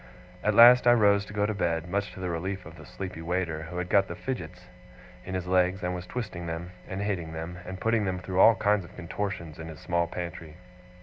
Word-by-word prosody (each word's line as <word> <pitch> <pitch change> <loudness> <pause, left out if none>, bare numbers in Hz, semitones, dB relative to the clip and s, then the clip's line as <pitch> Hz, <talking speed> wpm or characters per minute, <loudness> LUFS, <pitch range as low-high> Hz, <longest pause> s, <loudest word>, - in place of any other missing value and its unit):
At 105 0 +2
last 120 +2 +9
I 120 - +8
rose 100 -3 +4
to 105 - -11
go 105 0 +1
to 110 - -1
bed, 85 -4 -1
much 100 +3 -2
to - - -10
the 90 -1 -2
relief 95 +3 -4
of 80 +2 -11
the 75 -4 -13
sleepy 95 0 -7
waiter, 85 -2 -2
who 90 - -6
had 90 0 -2
got 100 +1 +3
the 85 - -6
fidgets 90 -5 -6 0.6
in 95 - -4
his 90 -1 -2
legs, 90 +1 +2
and 90 0 -1
was 90 0 -6
twisting 90 -8 -5
them, 85 +2 -5 0.2
and 95 +1 -4
hitting 90 -6 -2
them, 85 +2 -6
and 95 0 -6
putting 115 0 +1
them 95 -1 -1
through 90 +1 -3
all 115 +3 +8
kinds 105 -2 +2
of 85 - -14
contortions 85 -3 -5
in 80 - -7
his 80 -2 -9
small 85 -1 0
pantry. 85 -2 -7
90 Hz, 235 wpm, -28 LUFS, 85-100 Hz, 0.6 s, last